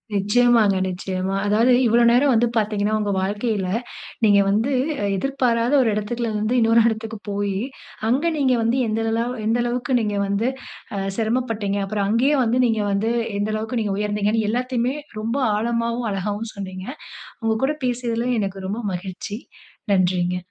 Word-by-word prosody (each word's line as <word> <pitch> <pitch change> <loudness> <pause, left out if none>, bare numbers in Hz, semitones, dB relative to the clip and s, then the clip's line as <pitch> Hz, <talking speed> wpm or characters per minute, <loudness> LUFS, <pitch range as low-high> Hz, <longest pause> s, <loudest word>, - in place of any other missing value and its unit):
நிச்சயமாங்க 210 0 +3
நிச்சயமா. 185 +1 -3
அதாவது 225 +5 +3
இவ்வளவு 235 +1 +5
நேரம் 265 +4 +4
வந்து 235 +1 +3
பாத்தீங்கன்னா, 210 -1 0
உங்க 205 -1 -1
வாழ்க்கையில 205 +1 -1 0.6
நீங்க 205 -2 +6
வந்து 220 +7 +1 0.4
எதிர்பாராத 245 +1 0
ஒரு 240 - +2
எடத்துல 230 +3 -2
இருந்து 215 +3 0
இன்னொரு 230 0 +5
எடத்துக்கு 220 0 -4
போயி, 200 -1 -1 0.5
அங்க 265 +7 +1
நீங்க 265 -3 +3
வந்து 230 +3 +1
எந்த 215 +1 -1 0.5
எந்த 225 +2 +2
அளவுக்கு 245 +2 -2
நீங்க 210 -2 -1
வந்து 200 +3 0 0.5
அ - - -2 0.2
சிரமப்பட்டீங்க. 225 -3 -1
அப்புறம் 200 0 -1
அங்கேயே 245 +7 +3
வந்து 240 +1 +1
நீங்க 225 -2 +1
வந்து 205 +3 0 0.3
எந்த 205 +1 -1
அளவுக்கு 220 +3 -2
நீங்க 205 -2 -1
உயர்ந்தீங்கன்னு 210 +1 0
எல்லாத்தையுமே 250 +1 -1 0.3
ரொம்ப 230 +4 -2 0.2
ஆழமாவும், 230 +2 -1
அழகாவும் 205 +3 -3
சொன்னீங்க. 190 -2 -7 0.6
உங்க 225 0 +2
கூட 300 +3 -1
பேசியதில 240 -1 -1
எனக்கு 195 -2 -3
ரொம்ப 210 +5 -3
மகிழ்ச்சி. 190 +3 -5 0.6
நன்றிங்க. 180 -1 +1
220 Hz, 145 wpm, -22 LUFS, 200-235 Hz, 0.6 s, நீங்க